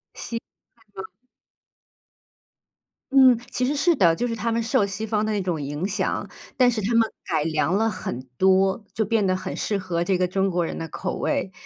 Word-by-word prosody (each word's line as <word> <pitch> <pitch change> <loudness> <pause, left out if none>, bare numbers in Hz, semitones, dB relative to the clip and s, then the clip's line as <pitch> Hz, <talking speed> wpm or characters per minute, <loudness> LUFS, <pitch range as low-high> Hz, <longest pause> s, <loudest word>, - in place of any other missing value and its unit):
西 230 -1 -5 0.6
餐 190 - -6
吗？ - - -13 2.0
嗯， 260 -3 +7
其 250 - -1
实 285 +3 0
是 330 +3 +3
的。 170 -4 +4
就 245 +7 -1
是 230 - -3
他 230 +1 -2
们 230 +1 0
受 225 -2 +2
西 200 +2 -4
方 215 -1 0
的 215 - -1
那 205 -2 0
种 175 -4 -2
影 145 +6 -3
响， 205 +1 -2 0.3
但 250 -2 +5
是 225 -3 -1
他 215 +5 -1
们 230 -1 +4 0.2
改 150 - 0
良 155 +3 0
了 225 +1 +2
很 185 - -4 0.2
多， 190 +2 +3
就 220 - 0
变 215 0 +1
得 185 -1 +2
很 185 - -5
适 205 - -1
合 175 -3 -2
这 185 0 +1
个 180 0 +1
中 195 +1 0
国 175 -1 0
人 - - -5
的 165 - -5
口 185 +2 -4
味。 190 - -1
195 Hz, 220 characters per minute, -24 LUFS, 180-230 Hz, 2.0 s, 嗯